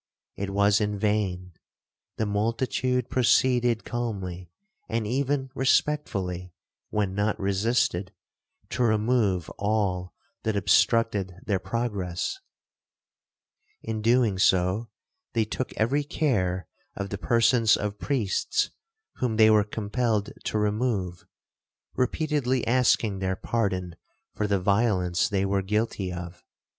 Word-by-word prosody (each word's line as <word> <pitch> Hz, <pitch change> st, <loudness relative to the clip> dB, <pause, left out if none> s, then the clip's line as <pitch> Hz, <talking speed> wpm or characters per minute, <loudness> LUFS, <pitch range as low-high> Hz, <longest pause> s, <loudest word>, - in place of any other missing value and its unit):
It 100 Hz, 0 st, -3 dB
was 100 Hz, +1 st, +3 dB
in 105 Hz, -1 st, -1 dB
vain; 100 Hz, -4 st, -1 dB, 0.6 s
the 110 Hz, -, 0 dB
multitude 115 Hz, +4 st, 0 dB
proceeded 125 Hz, -2 st, +3 dB
calmly, 95 Hz, -7 st, -4 dB, 0.4 s
and 115 Hz, -1 st, -1 dB
even 135 Hz, +3 st, -1 dB
respectfully, 95 Hz, -, 0 dB, 0.4 s
(when 105 Hz, -3 st, -1 dB
not 105 Hz, +2 st, 0 dB
resisted), 100 Hz, -2 st, 0 dB, 0.6 s
to 125 Hz, -, -2 dB
remove 110 Hz, -4 st, +2 dB
all 100 Hz, -3 st, -1 dB, 0.3 s
that 110 Hz, -1 st, -1 dB
obstructed 100 Hz, 0 st, +2 dB
their 100 Hz, -3 st, 0 dB
progress; 100 Hz, -, -3 dB, 1.4 s
in 110 Hz, -1 st, -3 dB
doing 115 Hz, -3 st, +3 dB
so, 95 Hz, +4 st, +2 dB, 0.4 s
they 115 Hz, -2 st, +2 dB
took 125 Hz, +4 st, -4 dB
every 135 Hz, +7 st, +1 dB
care 95 Hz, -, 0 dB, 0.3 s
of 100 Hz, 0 st, -4 dB
the 100 Hz, -, -4 dB
persons 115 Hz, -1 st, +4 dB
of 105 Hz, 0 st, -4 dB
priests 120 Hz, -9 st, 0 dB, 0.5 s
whom 120 Hz, -3 st, -1 dB
they 110 Hz, -1 st, +7 dB
were 105 Hz, -1 st, +5 dB
compelled 105 Hz, 0 st, -1 dB
to -, -, -1 dB
remove, 105 Hz, -4 st, -1 dB, 0.7 s
repeatedly 130 Hz, -2 st, 0 dB
asking 115 Hz, -4 st, +2 dB
their 95 Hz, 0 st, -1 dB
pardon 95 Hz, -5 st, -2 dB, 0.4 s
for 105 Hz, -, -1 dB
the 100 Hz, -1 st, +1 dB
violence 95 Hz, -3 st, +1 dB
they 100 Hz, -1 st, 0 dB
were 100 Hz, 0 st, +1 dB
guilty 105 Hz, -1 st, -1 dB
of. 90 Hz, 0 st, -7 dB
105 Hz, 110 wpm, -26 LUFS, 95-120 Hz, 1.4 s, they